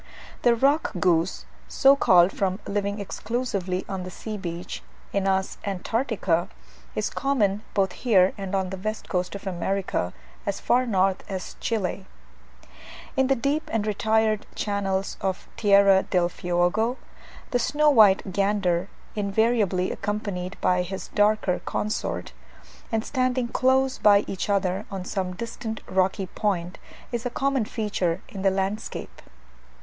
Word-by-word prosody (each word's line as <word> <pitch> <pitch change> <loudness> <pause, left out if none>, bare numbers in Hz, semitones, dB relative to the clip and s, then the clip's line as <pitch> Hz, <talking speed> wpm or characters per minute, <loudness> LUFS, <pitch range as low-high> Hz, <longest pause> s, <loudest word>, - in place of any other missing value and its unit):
The 240 -1 +4
rock 280 +6 +2
goose, 175 0 +1 0.2
so 275 0 +5
called 180 -8 +5
from 190 0 -1
living 200 0 -1
exclusively 200 -3 -2
on 190 -1 -4
the 180 - -6
sea 215 +4 -6
beach 175 -2 -5 0.3
(Anas 190 -1 0
antarctica), 200 -3 -1 0.5
is - - -1
common 215 -8 +1
both 195 -2 +2
here 190 -4 +3
and 195 -1 -4
on 190 -1 -1
the 190 - -4
west 215 +3 -4
coast 180 +1 -2
of 200 - -8
America, 185 - -1 0.3
as - - -2
far 250 +1 +2
north 190 -3 +2
as 190 -2 -5
Chile. 195 -3 -2 1.1
In 265 -1 +3
the 270 - +3
deep 280 +5 -1
and 220 -2 0
retired 215 0 +1
channels 195 -2 -1
of 190 -1 -2
Tierra 200 -2 +5
del 175 -3 +1
Fuego, 180 +9 0 0.5
the 245 - +2
snow 300 +4 +3
white 205 -6 +5
gander, 195 -3 +1 0.3
invariably 205 -2 +1
accompanied 200 -2 -3
by 180 0 +3
his 190 +2 -5
darker 205 -3 +2
consort, 215 +1 -2 0.6
and 225 0 0
standing 255 -2 0
close 260 +1 +2
by 205 -1 +6
each 195 +2 -4
other 195 0 0
on 190 -2 -5
some 185 -2 -3
distant 225 0 -5
rocky 190 +1 +1
point, 185 -2 -2 0.3
is 240 -2 -2
a 245 - -1
common 270 -1 0
feature 205 -5 -1
in 200 -6 -7
the 195 - +4
landscape. 195 +2 -3
200 Hz, 135 wpm, -25 LUFS, 185-225 Hz, 1.1 s, by